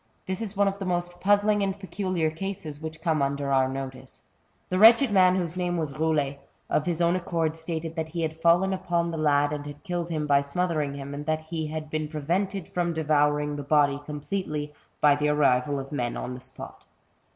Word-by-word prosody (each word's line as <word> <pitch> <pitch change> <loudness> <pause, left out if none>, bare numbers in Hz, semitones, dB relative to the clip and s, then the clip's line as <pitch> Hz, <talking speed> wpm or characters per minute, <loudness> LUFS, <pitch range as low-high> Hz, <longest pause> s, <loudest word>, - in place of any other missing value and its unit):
This 190 +3 -3
is 210 -3 -5
one 200 0 +4
of 195 0 -2
the 195 - -4
most 175 -1 -2
puzzling 205 +1 +3
and 195 0 -1
peculiar 185 -3 -1
cases 160 -4 -6
which 160 0 -7
como 160 -4 +2
under 140 0 -1
our 130 -1 +4
notice. 130 -1 -7 0.4
^ - - -41
The 185 - 0
wretched 230 +3 +7
man, 185 -2 +5
whose 175 -2 -2
name 175 -1 -1
was 155 -4 -2
Boulet^ 145 -2 0 0.3
of 150 - +1
his 175 -1 0
own 170 +1 +3
accord 165 -3 -1
stated 165 0 -4
that 160 -1 -3
he 170 +1 -3
had 160 0 -4
fallen 175 +3 +4
upon 170 -2 -1
the 165 - -4
lad 145 -1 +3
and 145 -1 -4
had 145 0 -10
killed 175 -1 -3
him 155 -2 -1
by 140 -1 +4
smothering 150 -1 -1
him, 140 0 -6
and 145 +1 -6
that 155 0 0
he 160 0 -4
had 155 0 -6
been 155 -1 -1
prevented 175 +5 -2
from 175 -1 -1
devouring 150 -2 +1
the - - -3
body 145 0 +2
completely 150 0 -4 0.3
by 145 -1 +6
the 150 +1 0
arrival 140 -1 +2
of 135 0 -7
men 120 -5 -2
on 125 - -4
the 125 - -7
spot. - - -11
160 Hz, 210 wpm, -26 LUFS, 145-180 Hz, 0.4 s, wretched